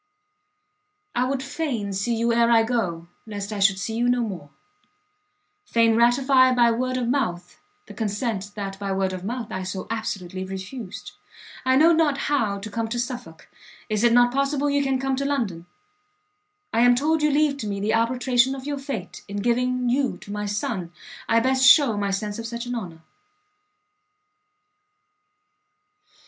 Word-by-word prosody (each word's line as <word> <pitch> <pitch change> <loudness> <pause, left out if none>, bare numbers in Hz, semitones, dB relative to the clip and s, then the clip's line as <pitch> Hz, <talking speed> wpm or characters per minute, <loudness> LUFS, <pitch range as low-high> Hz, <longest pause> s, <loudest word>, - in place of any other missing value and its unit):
I 250 - +1
would 265 0 -2
fain 270 -8 -3
see 205 +5 -1
you 230 +1 +1
ere 235 0 +3
I 230 -1 +5
go, 190 -8 -2 0.2
lest 205 0 -5
I 205 - -4
should 195 -1 +4
see 195 +4 -4
you 240 +1 +1
no 245 0 +2
more; 185 -10 -5 1.1
fain 230 - +3
ratify 255 +2 +4
by 240 -1 +5
word 255 +2 -1
of 245 -2 -1
mouth 180 -10 -2 0.3
the - - -11
consent 205 -2 -3
that 195 -2 -5
by 200 -1 -3
word 190 -1 0
of 185 -1 -6
mouth 230 +2 -4
I 185 - -3
so 185 0 -5
absolutely 190 -5 -4
refused! 190 +3 -7 0.5
I 260 0 +4
know 320 +5 +6
not 310 -4 +2
how 220 -9 +1
to 215 +1 -7
come 225 +2 -2
to 235 +2 -4
Suffolk, 240 -10 -6 0.4
is 215 0 0
it 235 - +5
not 245 +1 +4
possible 275 +1 0
you 285 0 +2
can 270 -1 +1
come 270 0 -1
to 275 - -1
London? 225 -12 -2 1.1
I 225 - +2
am 245 +1 +6
told 310 +5 +1
you 300 - +3
leave 295 -1 +2
to 220 - -5
me 200 -1 -3
the 210 +2 0
arbitration 245 +2 +2
of 265 -1 -9
your 285 -1 -3
fate, 230 -10 -6
in 200 - -6
giving 250 +3 0
you 260 +2 +1
to 205 - -10
my 210 0 -3
son, 200 -3 -3 0.4
I 230 - +5
best 260 +1 +1
shew 255 -3 +7
my 200 -1 -1
sense 205 +2 -3
of 230 - -5
such 235 +1 -5
an 245 - -4
honour. 175 -9 -6
235 Hz, 175 wpm, -24 LUFS, 200-260 Hz, 1.1 s, shew